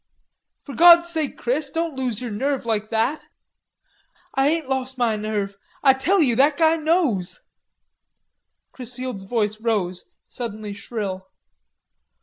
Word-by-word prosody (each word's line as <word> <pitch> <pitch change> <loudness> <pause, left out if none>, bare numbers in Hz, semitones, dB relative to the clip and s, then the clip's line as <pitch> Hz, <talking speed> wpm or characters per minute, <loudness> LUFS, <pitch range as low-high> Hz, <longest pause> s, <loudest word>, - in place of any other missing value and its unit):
"For 280 - -9
God's 340 +4 +7
sake, 320 -4 -3
Chris, 275 +4 -1
don't 330 +1 -2
lose 250 -5 -2
your 245 -3 -5
nerve 265 +4 -1
like 215 -2 -1
that." 225 +7 0 1.1
"Ah 270 0 +3
ain't 315 0 +1
lost 265 -1 -3
ma 235 -3 +1
nerve. 210 -2 -3 0.3
Ah 270 -2 +7
tell 340 +7 +2
you 245 -5 +2
that 285 +2 +4
guy 325 -1 +4
knows." 310 - 0 1.3
Chrisfield's 250 -4 -6
voice 215 0 -1
rose, 195 -6 -1 0.2
suddenly 215 -4 -6
shrill. 200 -3 -5
250 Hz, 130 wpm, -22 LUFS, 215-290 Hz, 1.3 s, God's